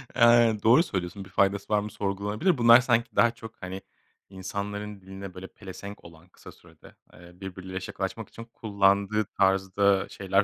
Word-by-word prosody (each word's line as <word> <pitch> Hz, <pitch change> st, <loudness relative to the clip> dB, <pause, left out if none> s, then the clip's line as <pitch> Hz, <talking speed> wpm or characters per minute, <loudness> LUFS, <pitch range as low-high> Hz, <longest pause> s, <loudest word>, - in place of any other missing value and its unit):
Aynen. 115 Hz, -2 st, +5 dB
Doğru 125 Hz, +9 st, +6 dB
söylüyorsun, 95 Hz, -, -5 dB
bir -, -, -15 dB
faydası 100 Hz, +2 st, 0 dB
var 105 Hz, -, +4 dB
mı 105 Hz, 0 st, -5 dB
sorgulanabilir. 105 Hz, -, -1 dB
Bunlar 120 Hz, +1 st, +8 dB
sanki 120 Hz, -1 st, 0 dB
daha 120 Hz, -, +4 dB
çok, 115 Hz, -1 st, -11 dB
hani, 95 Hz, +1 st, -6 dB, 0.5 s
insanların 100 Hz, +1 st, -6 dB
diline 95 Hz, 0 st, -9 dB
böyle 95 Hz, +1 st, -9 dB
pelesenk 100 Hz, +1 st, -10 dB
olan 85 Hz, +2 st, -15 dB
kısa -, -, -14 dB
sürede, -, -, -19 dB, 0.2 s
eee, 85 Hz, +1 st, -15 dB
birbiriyle 95 Hz, 0 st, -6 dB
şakalaşmak 95 Hz, +3 st, -5 dB
için 115 Hz, -, -10 dB
kullandığı 100 Hz, -1 st, +1 dB
tarzda 95 Hz, 0 st, +1 dB
şeyler 95 Hz, 0 st, +1 dB
100 Hz, 155 wpm, -27 LUFS, 95-110 Hz, 0.5 s, Bunlar